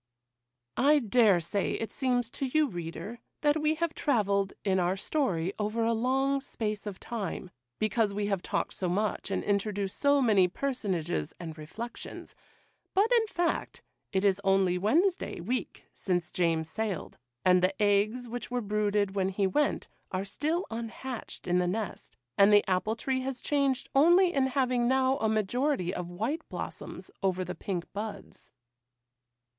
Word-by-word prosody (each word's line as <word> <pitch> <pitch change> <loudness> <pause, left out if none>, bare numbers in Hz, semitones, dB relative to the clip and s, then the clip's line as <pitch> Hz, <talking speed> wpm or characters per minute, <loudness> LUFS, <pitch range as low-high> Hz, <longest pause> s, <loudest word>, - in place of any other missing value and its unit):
I 295 +3 +5
dare 225 -6 +4
say 170 +4 -1
it 225 - -3
seems 245 -3 0
to 275 - -2
you, 305 +3 +3
reader, 175 +4 -6 0.2
that 295 +1 +2
we 305 +1 +2
have 335 0 -1
travelled, 200 -8 +1
in 190 -2 +2
our 180 +2 +1
story, 190 - 0
over 215 +2 0
a 230 - +2
long 270 +4 +1
space 215 -6 -4
of 200 -2 -6
time, 200 -5 -5 0.3
because 215 0 +1
we 205 +1 -2
have 195 -3 0
talked - - -2
so 185 - -2
much, 205 +3 -1
and 195 - -1
introduced 200 -1 -1
so 285 0 +4
many 210 -8 +4
personages 185 - -2
and 165 -3 -6
reflections; 210 +10 -8 0.6
but, 415 +5 +4
in 460 -2 +4
fact, 350 -4 -2 0.3
it 190 0 +1
is 200 0 +3
only 195 -2 +3
Wednesday 325 - +1
week 235 +9 -3
since 175 -2 -1
James 165 -3 +1
sailed, 205 -5 -4 0.3
and 180 0 +6
the 185 +1 +1
eggs 210 +4 +2
which 240 +1 -5
were 245 0 -1
brooded 210 -2 0
when 190 -1 +1
he 195 +1 0
went 290 +10 +1 0.2
are 190 0 -2
still 310 - -1
unhatched 230 +2 -6
in 180 0 +2
the 180 - +1
nest, 205 +2 -4 0.2
and 200 +1 +7
the 205 0 +5
apple 190 +4 +1
tree 260 +3 -1
has 260 -1 -4
changed 275 -2 0
only 345 +6 +5
in 270 -2 +2
having 255 -2 +1
now 260 +1 +3
a 220 - +1
majority 215 - 0
of 180 -2 -4
white 225 - -2
blossoms - - -6
over 185 -1 0
the 180 - -4
pink 185 -2 -4
buds. 210 +1 -7
215 Hz, 160 wpm, -29 LUFS, 190-260 Hz, 0.6 s, and